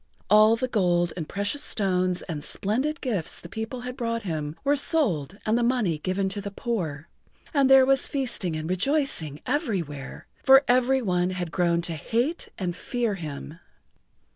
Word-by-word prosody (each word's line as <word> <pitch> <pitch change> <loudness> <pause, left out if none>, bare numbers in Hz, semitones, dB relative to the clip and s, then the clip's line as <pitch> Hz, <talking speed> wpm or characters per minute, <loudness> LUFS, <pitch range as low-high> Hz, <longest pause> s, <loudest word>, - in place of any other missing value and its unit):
All 215 +1 +7
the 255 +3 -2
gold 175 -7 +1
and 165 -4 -5
precious 205 +9 -2
stones 185 -3 0
and 150 -4 -5
splendid 260 +10 -1
gifts 210 - -2
the - - -9
people 220 +6 -5
had 250 0 -6
brought 230 -2 -2
him 155 -4 -3
were 285 +1 +3
sold 200 - +2
and 220 - +2
the 240 - +2
money 235 -10 +1
given 185 +4 -1
to 200 +1 -4
the 200 - -5
poor, 175 - -3 0.5
and 280 -3 +3
there 265 -1 +8
was 270 0 +2
feasting 235 - -1
and 155 0 -4
rejoicing 185 - 0
everywhere, 190 - -3 0.2
for 270 +1 +7
every 255 +1 +3
one 180 -3 +1
had 180 -3 -4
grown 170 -2 +1
to 170 - -3
hate 235 - -2
and 180 -3 -3
fear 235 +1 -1
him. 155 -2 -7
200 Hz, 165 wpm, -26 LUFS, 175-250 Hz, 0.5 s, there